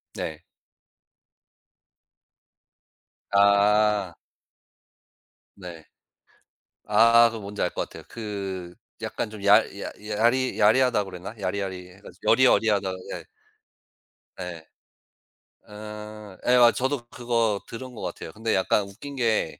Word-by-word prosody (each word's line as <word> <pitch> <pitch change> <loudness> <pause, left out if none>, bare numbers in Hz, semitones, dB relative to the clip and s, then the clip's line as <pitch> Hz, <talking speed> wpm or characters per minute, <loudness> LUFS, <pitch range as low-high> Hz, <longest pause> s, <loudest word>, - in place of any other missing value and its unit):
네. 80 -1 -5 2.9
아. 100 -1 +3 1.4
네. 90 -4 -10 1.0
아 115 +2 +6
그거 115 -1 -7
뭔지 100 +1 -6
알 90 - +2
것 - - -2
같아요. - - -11
그 95 -5 -6 0.3
약간 - - -3
좀 105 -1 -10
야 100 +1 +8 0.2
야 - - -5 0.2
야리 120 +5 +1
야리하다 115 +1 +4
그러나 95 +1 -8
야리야리해 95 -1 -5
가지고 90 -2 -2
여리여리하다. 110 -6 +3 0.2
예. - - -6 1.2
예. 85 -3 -7 1.0
아. 105 -1 -9
예 - - +4
아 120 -1 +7
저도 130 -1 -2
그거 115 -4 0
들은 125 +2 -8
것 - - -8
같아요. 80 - -6
근데 110 +5 -1
약간 95 +2 +2
웃긴 110 +9 -10
게 115 -10 0
105 Hz, 195 characters per minute, -25 LUFS, 95-115 Hz, 2.9 s, 야